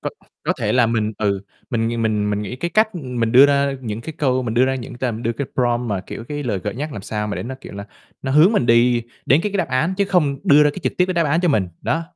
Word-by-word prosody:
Có - - -3 0.3
có - - +2
thể 110 -4 0
là 125 -2 +4
mình, 110 -2 0
ừ, 100 -2 0 0.3
mình 115 0 -1
mình 105 -2 0
mình 105 0 -1
nghĩ 125 +5 -6
cái 170 +6 -3
cách, 215 0 +3
ừm, 130 -8 -5
mình 115 0 +1
đưa 135 +3 +8
ra 140 0 +2
những 110 -3 -5
cái 160 - -7
câu 130 -3 +1
mình 115 -2 -3
đưa 125 +2 +4
ra 135 0 0
những 125 -3 -7
t 120 - -6 0.2
đưa 115 - 0
cái 130 +3 -4
prompt 120 -1 0
mà, 100 -3 -1
kiểu, 115 - -7
cái 145 0 -4
lời 110 -7 -1
gợi 100 +2 -4
nhắc 150 +3 -4
làm 100 - -7
sao 105 0 -3
mà 105 - -3
để - - -4
nó, 130 +3 -5
kiểu - - -10
là, 100 0 -7 0.4
nó 135 - -2
hướng 155 +8 +6
mình 170 - +1
đi 120 +1 +4 0.2
đến 140 +5 +5
cái 210 - -2
cái 200 - 0
đáp 175 - 0
án 135 +8 0
chứ 200 - +2
không 150 -8 +1
đưa 145 +1 +6
ra 150 - +4
cái 170 - -8
trực - - 0
tiếp 180 - +5
cái 185 - -2
đáp 170 -1 +2
án 155 +4 +2
cho 180 - +1
mình. 105 - +1
Đó. 165 - 0
125 Hz, 305 wpm, -20 LUFS, 115-150 Hz, 0.4 s, đưa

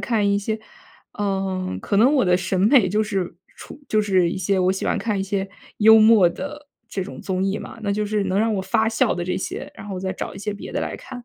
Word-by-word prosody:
看 215 -4 +1
一 200 - +2
些 215 +2 -3 0.6
嗯， 190 - -2
可 200 - -1
能 250 +7 +5
我 270 -8 +3
的 180 -1 +4
审 185 0 -1
美 215 -1 +5
就 210 +4 +1
是 190 -5 -3 0.2
处 290 - -11
就 215 -1 +2
是 185 -4 +2
一 - - -4
些 190 +1 0
我 185 0 +3
喜 190 - -4
欢 - - 0
看 210 -4 -1
一 - - 0
些 195 0 -2 0.3
幽 220 +1 +7
默 215 -5 +6
的 295 +11 -7 0.2
这 190 -5 -3
种 - - -9
综 190 0 -2
艺 195 +1 0
嘛。 230 - -9
那 200 -1 0
就 210 +1 -1
是 205 -1 -1
能 190 +1 0
让 225 0 +1
我 190 - -1
发 220 +4 +1
笑 225 - +1
的 175 - -3
这 185 - -2
些， - - -5
然 205 - -10
后 190 -2 -4
再 190 0 -2
找 - - -6
一 - - -9
些 205 +1 -3
别 200 - -9
的 - - -1
来 - - -4
看。 245 -2 -10
200 Hz, 280 characters per minute, -22 LUFS, 190-220 Hz, 0.6 s, 幽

